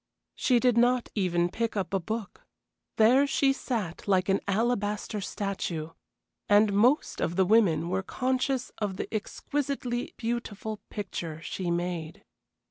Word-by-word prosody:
She 250 -2 +2
did 245 -1 +3
not 245 0 +3
even 175 -4 +1
pick 225 +4 -2
up 195 0 -2
a 195 - +2
book. 215 +4 -5 0.5
There 255 +6 +5
she 275 -1 +3
sat 215 -11 -4
like 185 -1 +2
an 195 - +3
alabaster 210 -1 0
statue, 185 -6 -3 0.6
and 205 0 +5
most 245 +9 +3
of 170 - 0
the 190 0 +4
women 180 -6 +4
were 185 +2 0
conscious 255 +4 -1
of 200 -3 -2
the - - -5
exquisitely 250 +2 -3
beautiful 225 -2 -3
picture 170 -6 -5
she 180 0 -3
made. 170 -2 -3
210 Hz, 135 wpm, -28 LUFS, 185-240 Hz, 0.6 s, There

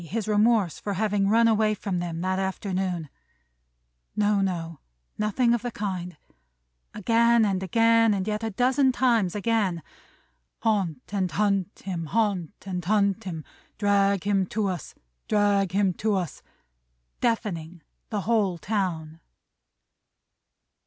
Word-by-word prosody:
His 210 +6 -4
remorse 210 -4 +2
for 205 - -3
having 205 -1 +1
run 230 +2 +5
away 215 -1 +2
from 195 -3 -3
them 170 -1 -4
that 185 +1 0
afternoon! 190 -3 -2 1.1
No, 205 -1 +2
no. 170 -4 -3 0.4
Nothing 235 +3 +2
of 240 - 0
the 245 - -3
kind. 185 -6 -4 0.8
Again, 230 +2 +3
again, 225 +4 +3
and 190 0 -3
yet 215 +1 -2
a 225 - -1
dozen 260 +5 +2
times 235 -8 +2
again. 205 -6 0 0.8
"Haunt 195 - -1
and 190 -3 0
hunt 200 -1 -1
him, 170 -4 -3
haunt 205 -3 -1
and 180 -2 -4
hunt 200 +1 +1
him, 165 -4 -5 0.3
Drag 200 -2 +2
him 195 -2 +1
to 210 0 -1
us, 180 -3 -6 0.3
drag 205 -3 +2
him 195 -1 +2
to 215 +3 0
us!" 180 -6 -3 0.8
Deafening 180 -8 -2 0.3
the 210 -3 -2
whole 205 -5 +1
town! 165 -5 -3
200 Hz, 125 wpm, -26 LUFS, 185-220 Hz, 1.1 s, run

